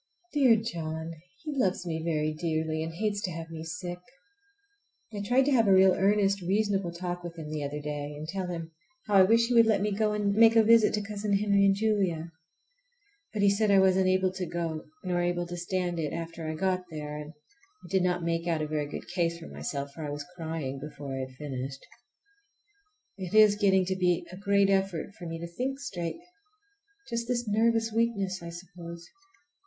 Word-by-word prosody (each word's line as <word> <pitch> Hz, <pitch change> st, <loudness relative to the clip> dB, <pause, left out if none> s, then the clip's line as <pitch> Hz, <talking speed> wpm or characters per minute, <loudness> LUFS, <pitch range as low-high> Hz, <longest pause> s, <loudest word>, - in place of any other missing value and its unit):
Dear 265 Hz, -6 st, +6 dB
John! 165 Hz, -7 st, -4 dB, 0.3 s
He 305 Hz, -2 st, -4 dB
loves 190 Hz, -8 st, +1 dB
me 160 Hz, -2 st, -2 dB
very 155 Hz, -2 st, 0 dB
dearly, 160 Hz, 0 st, -1 dB
and 160 Hz, +1 st, -3 dB
hates 205 Hz, +4 st, -1 dB
to 185 Hz, -, -2 dB
have 165 Hz, 0 st, -7 dB
me 160 Hz, -1 st, -6 dB
sick. 175 Hz, +2 st, -5 dB, 1.1 s
I 205 Hz, -, -4 dB
tried 245 Hz, +6 st, +3 dB
to 290 Hz, -, +2 dB
have 230 Hz, -5 st, +4 dB
a -, -, +5 dB
real 190 Hz, 0 st, +7 dB
earnest 200 Hz, +1 st, +2 dB
reasonable 195 Hz, 0 st, 0 dB
talk 175 Hz, 0 st, -5 dB
with 170 Hz, -1 st, -7 dB
him 155 Hz, -2 st, -7 dB
the 155 Hz, -1 st, -3 dB
other 145 Hz, +1 st, -4 dB
day, 145 Hz, 0 st, -5 dB
and 155 Hz, +1 st, -7 dB
tell 185 Hz, +2 st, -3 dB
him 165 Hz, -2 st, -5 dB, 0.3 s
how 210 Hz, -, -3 dB
I -, -, +9 dB
wish 225 Hz, +5 st, +5 dB
he 245 Hz, -, -1 dB
would 230 Hz, -1 st, +6 dB
let 215 Hz, -3 st, +3 dB
me 210 Hz, +1 st, 0 dB
go 210 Hz, +1 st, +1 dB
and 205 Hz, -1 st, +1 dB
make 225 Hz, +2 st, +6 dB
a 225 Hz, -, +7 dB
visit 225 Hz, -1 st, +5 dB
to 210 Hz, -, -2 dB
Cousin 205 Hz, 0 st, -3 dB
Henry 200 Hz, -1 st, +3 dB
and 195 Hz, 0 st, +4 dB
Julia. 195 Hz, -6 st, 0 dB, 1.0 s
But 205 Hz, -2 st, -1 dB
he 200 Hz, -, +6 dB
said 210 Hz, +1 st, +1 dB
I 200 Hz, -, +6 dB
wasn't 190 Hz, 0 st, +4 dB
able 185 Hz, 0 st, +2 dB
to 185 Hz, -1 st, -4 dB
go, 165 Hz, -2 st, -3 dB, 0.2 s
nor 180 Hz, -1 st, 0 dB
able 175 Hz, 0 st, 0 dB
to 175 Hz, 0 st, -6 dB
stand 175 Hz, 0 st, -2 dB
it 150 Hz, -3 st, -2 dB
after 165 Hz, -1 st, -5 dB
I 155 Hz, -, -3 dB
got 185 Hz, +2 st, 0 dB
there; 150 Hz, -2 st, -6 dB
and 150 Hz, +1 st, -8 dB, 0.5 s
I -, -, -10 dB
did 190 Hz, -1 st, +3 dB
not 180 Hz, -1 st, 0 dB
make 165 Hz, 0 st, -1 dB
out 160 Hz, -2 st, 0 dB
a -, -, -2 dB
very 150 Hz, -1 st, -2 dB
good -, -, -7 dB
case 170 Hz, -2 st, 0 dB
for 165 Hz, -, -10 dB
myself, 140 Hz, -1 st, -4 dB
for 155 Hz, +3 st, -8 dB
I 150 Hz, -, -3 dB
was 145 Hz, 0 st, -5 dB
crying 160 Hz, -5 st, -4 dB
before 140 Hz, -1 st, -7 dB
I -, -, -3 dB
had 130 Hz, 0 st, -6 dB
finished. 135 Hz, -2 st, -5 dB, 1.3 s
It 185 Hz, +2 st, -4 dB
is 215 Hz, -1 st, +8 dB
getting 190 Hz, -3 st, +3 dB
to 190 Hz, +1 st, -1 dB
be 180 Hz, -2 st, +1 dB
a -, -, -8 dB
great 200 Hz, 0 st, +2 dB
effort 195 Hz, -1 st, 0 dB
for 175 Hz, -, -9 dB
me 165 Hz, 0 st, -4 dB
to 170 Hz, -, -5 dB
think 260 Hz, +10 st, -3 dB
straight. 175 Hz, -11 st, -4 dB, 0.9 s
Just 235 Hz, -1 st, -3 dB
this 240 Hz, -2 st, -1 dB
nervous 225 Hz, +1 st, +2 dB
weakness, 200 Hz, -5 st, 0 dB
I 170 Hz, -, -7 dB
suppose. 170 Hz, -1 st, -9 dB
180 Hz, 210 wpm, -29 LUFS, 165-205 Hz, 1.3 s, I